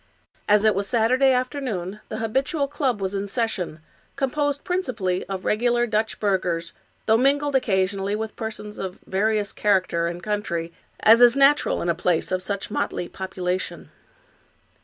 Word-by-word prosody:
As 210 0 +5
it 215 -1 +5
was 200 +1 -2
Saturday 250 +5 +3
afternoon 250 -7 -2
the 215 - -4
habitual 265 +7 0
club 275 -6 -1
was 190 0 -2
in 200 0 -2
session, 195 -8 -2 0.3
composed 285 +1 -1
principally 235 - -1
of 190 -1 -5
regular 240 +2 +2
Dutch 220 -1 -1
burghers, 180 -5 -1 0.3
though 220 0 +4
mingled 280 +3 +2
occasionally 195 -4 +1
with 220 0 -5
persons 215 -1 -6
of 190 -1 -5
various 205 +1 0
character 185 -5 +1
and 170 +1 -6
country, 170 -6 -2 0.3
as 225 +2 +7
is 245 +2 +7
natural 280 +2 +4
in - - -3
a 170 - +3
place 170 -1 0
of 185 0 0
such 200 +1 -3
motley 175 - -2
population. 185 -1 -4
210 Hz, 150 wpm, -24 LUFS, 190-250 Hz, 0.3 s, as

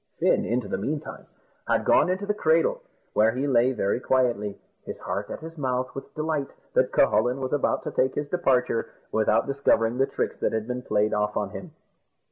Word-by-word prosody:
Fin, - - +2
in 120 +2 0
the 100 -3 -4
meantime, 145 +8 -5 0.4
had - - +1
gone - - +4
into 185 +2 -1
the 210 - 0
cradle, 165 -5 +2 0.3
where 110 +1 +4
he 130 +3 -1
lay 125 -2 +3
very 105 -3 0
quietly, 120 -6 0 0.3
his - - -7
heart - - -4
at - - -6
his 165 0 -9
mouth 130 -2 -1
with 135 - -9
delight 155 -2 -1 0.2
that - - +2
Cucullin 125 +2 +3
was 130 0 -3
about 145 - +1
to - - -4
take 130 0 +1
his 145 - -2
departure, 130 -8 +1 0.2
without 110 0 +2
discovering 125 -4 +1
the 135 - +3
tricks - - -3
that - - -1
had 110 0 -2
been 125 0 -3
played 105 -3 +1
off 105 0 0
on 100 -2 -2
him. 160 - -9
130 Hz, 195 wpm, -26 LUFS, 115-145 Hz, 0.4 s, gone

